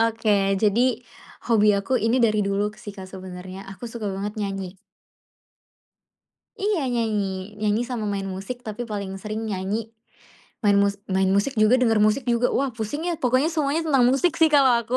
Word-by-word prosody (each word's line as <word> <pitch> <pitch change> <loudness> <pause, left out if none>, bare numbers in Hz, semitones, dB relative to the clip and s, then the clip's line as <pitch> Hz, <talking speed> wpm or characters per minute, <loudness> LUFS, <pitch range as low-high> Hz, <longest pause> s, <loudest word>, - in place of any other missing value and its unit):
Oke. 220 -2 +1 0.2
Jadi, 230 +3 +2 0.5
hobi 215 -3 +4
aku 200 +6 -2
ini 225 +3 +2
dari 215 -3 +3
dulu 200 +1 -1
sih, 220 -3 -8
Kak. 190 -2 -9
Sebenarnya 185 0 -9
aku 195 +5 -8
suka 230 -2 -6
banget 200 +2 -4
nyanyi. 195 -2 -4 1.9
Iya, 410 -2 +1
nyanyi. 220 -3 0 0.4
Nyanyi 215 +1 +1
sama 235 -4 -3
main 195 -1 -3
musik, 195 +6 -5
tapi 215 +2 -4
paling 200 -3 -4
sering 215 +1 -4
nyanyi. 210 +2 -3 0.7
Main 205 -1 +5
mus 200 0 +2 0.2
main 190 0 +2
musik 230 +7 +1
juga, 215 +3 +5
denger 225 -3 +3
musik 215 +5 +2
juga. 240 +1 +2
Wah, 275 0 0
pusing 235 +8 -3
ya, 340 -3 -3
pokoknya 255 +4 +2
semuanya 310 +1 0
tentang 270 -4 +4
musik 275 +7 +2
sih, 320 - +7
kalau 280 -4 +5
aku. 235 +2 -2
215 Hz, 170 wpm, -24 LUFS, 200-250 Hz, 1.9 s, sih